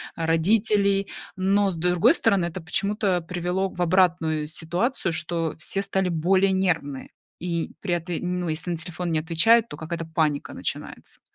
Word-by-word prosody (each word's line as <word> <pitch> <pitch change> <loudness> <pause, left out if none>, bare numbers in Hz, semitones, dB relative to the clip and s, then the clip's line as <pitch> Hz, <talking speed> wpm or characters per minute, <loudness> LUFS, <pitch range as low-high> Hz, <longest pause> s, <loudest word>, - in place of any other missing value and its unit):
а, 165 - -2
родителей. 200 +4 +2 0.3
Но, 195 +2 +2
с 185 - -3
другой 180 - +3
стороны, 200 - +2
это 175 +2 -5
почему-то 200 +3 0
привело 180 +3 -2
в 180 - -7
обратную 165 -3 +2
ситуацию, 175 - -2
что 165 -1 -2
все 195 +4 -2
стали 195 -1 -1
более 185 +3 +2
нервные, 165 -8 -1 0.3
и 170 -1 -3
при 185 -3 -1
этом, 180 +1 -3
ну, 175 - -3
если 160 +3 -2
на 170 - -2
телефон 175 +1 -4
не 160 - +1
отвечают, 215 +9 +3
то - - -8
какая-то 165 +2 -5
паника 160 -3 -1
начинается. - - -6
175 Hz, 160 wpm, -24 LUFS, 165-195 Hz, 0.3 s, другой